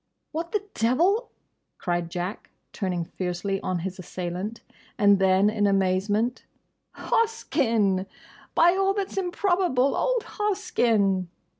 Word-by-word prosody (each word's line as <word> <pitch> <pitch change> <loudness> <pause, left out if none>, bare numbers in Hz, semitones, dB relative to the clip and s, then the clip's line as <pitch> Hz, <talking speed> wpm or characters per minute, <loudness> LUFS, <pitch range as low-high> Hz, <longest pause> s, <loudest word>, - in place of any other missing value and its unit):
"What 330 +2 -4
the 420 -1 0
devil—?" 345 - +2 0.5
cried 175 -1 -2
Jack, 180 +4 -5 0.2
turning 180 -4 -2
fiercely 185 +3 -3
on 185 - -1
his 190 0 -5
assailant. 185 +5 -5 0.4
And 200 -1 +5
then 190 +1 +4
in 210 -1 +2
amazement, 200 +5 +1 0.5
"Hoskyn! 235 - +1 0.5
By 340 +1 +6
all 390 +1 +1
that's 395 -1 -3
improbable, 355 -7 +1
old - - +1
Hoskyn!" 230 - +1
215 Hz, 110 wpm, -26 LUFS, -, 0.5 s, By